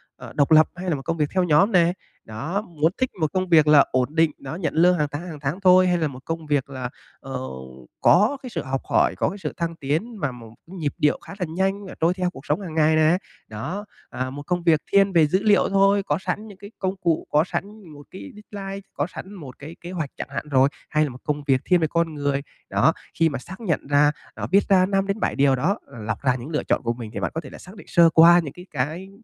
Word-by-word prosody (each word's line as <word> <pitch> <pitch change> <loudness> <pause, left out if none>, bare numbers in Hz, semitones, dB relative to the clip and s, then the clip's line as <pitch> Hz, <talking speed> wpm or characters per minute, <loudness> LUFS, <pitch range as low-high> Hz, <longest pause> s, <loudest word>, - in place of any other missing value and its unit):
ờ, - - -11
độc 145 +2 +1
lập 155 0 +7
hay 180 +1 -4
là 165 - +1
một 135 - -6
công 165 0 -1
việc 150 -2 0
theo 185 -1 +2
nhóm 180 +6 +4
nè? 175 -3 +4 0.3
Đó, 140 - -3
muốn 165 -5 0
thích 260 -1 0
một 155 -2 0
công 185 -1 -1
việc 155 -3 +5
là 150 -2 +7
ổn 130 +4 0
định, 165 -1 +4
đó 135 +3 -7
nhận 170 -2 -2
lương 175 +3 +4
hàng 150 -2 +1
tháng, 155 +5 -5
hàng 155 -4 -8
tháng 145 +6 -3
thôi, 185 -1 +6
hay 180 -1 +2
là 160 -2 0
một 130 -3 -9
công 165 -1 -4
việc 145 -3 0
là, 130 -2 -5 0.3
ờ, - - -6 0.6
có 210 +11 +4
cái 255 - -6
sự 170 -8 -3
học 135 0 -3
hỏi, - - +3
có - - +1
cái 200 - -7
sự 195 - -5
thăng 170 -1 -2
tiến 165 - -3
mà 145 -6 -1
một 115 -3 -12
nhịp 165 -6 -4
điệu 150 - +2
khá - - -9
là 180 - 0
nhanh, 195 +4 -1
ờ, - - -9
trôi 165 +2 +3
theo 180 -1 -1
cuộc 140 -5 -13
sống 150 +7 0
hàng 170 -5 -7
ngày 155 0 +4
nè? 155 +2 +4 0.3
Đó, 160 - -5 0.2
à, 130 0 -4
một 145 +2 -8
công 175 -1 -1
việc 160 -3 +3
thiên 200 0 +4
về 165 -3 +5
dữ 190 +6 0
liệu 205 -3 +4
thôi, 195 0 +3
có - - 0
sẵn 190 +3 -4
những 200 -3 -12
cái 200 +2 -12
công 190 0 -1
cụ, 165 -2 0
có 150 +1 +4
sẵn 205 +2 -6
một 145 0 -12
cái 100 - -9 0.2
deadline, 195 -1 -6
có 145 - -1
sẵn 190 +2 -9
một 145 -10 -11
cái 155 +4 -9
kế 175 - -8
hoạch 160 -6 -3
chẳng - - -6
hạn 140 +2 -5
rồi, 135 -1 +4 0.2
hay 155 0 +2
là 150 - -1
một 125 0 -11
công 150 -1 -2
việc 135 -2 +2
thiên 180 - +4
về 160 - +1
con 165 +1 0
người? 140 -1 -1 0.3
Đó, 160 - +3 0.3
khi 165 0 +4
mà 140 - -4
xác 190 +9 -11
nhận 170 -10 -2
ra, 145 +1 +4 0.2
đó - - -4
viết 200 +2 +5
ra 185 -2 +5
5-7 195 +2 -1
điều 135 -1 +3
đó, 165 +11 0
ờ, 120 - -13
lọc 110 0 -3
ra 130 -2 +2
những 125 +3 -7
lựa 150 -2 -1
chọn - - 0
của 115 0 0
mình 115 -3 -8
thì - - -4
bạn - - -2
có 160 - -2
thể - - -11
là - - -11
xác 185 +3 -13
định 205 - -13
sơ 170 -1 +6
qua 170 +2 +7
những 145 -3 -7
cái 180 +2 -12
cái 155 +8 -3
165 Hz, 270 wpm, -23 LUFS, 145-185 Hz, 0.6 s, lập